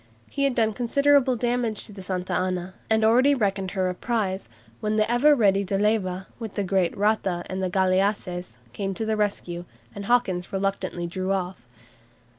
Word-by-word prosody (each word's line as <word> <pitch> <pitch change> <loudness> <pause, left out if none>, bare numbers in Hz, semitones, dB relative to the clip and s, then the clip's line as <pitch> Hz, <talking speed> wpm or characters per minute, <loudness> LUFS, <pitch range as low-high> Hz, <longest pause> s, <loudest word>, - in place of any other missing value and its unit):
He 280 -1 0
had 270 -3 +1
done 220 -2 +2
considerable 270 +2 +3
damage 240 -2 -1
to 210 - -11
the 195 - -9
"Santa 185 -1 -3
Ana," 185 0 -1 0.2
and 220 0 +3
already 255 +6 +5
reckoned 195 -5 0
her 185 -1 +2
a 180 - -1
prize, 195 - -2 0.3
when 215 0 -1
the 215 0 +2
ever 290 +5 +5
ready 200 -5 +3
De 195 0 -1
Leyva, 195 -3 0
with 225 -4 -6
the 205 - 0
great 185 -2 +1
"Rata" 195 -4 +1
and 190 0 -4
the 185 - 0
galleasses, 185 -2 0 0.2
came 195 +3 -3
to 220 - -2
the 220 0 0
rescue, 195 -4 -2 0.3
and 200 - -6
Hawkins 195 -7 +1
reluctantly 195 -3 -2
drew 185 +2 -3
off. 180 -9 -3
200 Hz, 180 wpm, -25 LUFS, 185-225 Hz, 0.3 s, already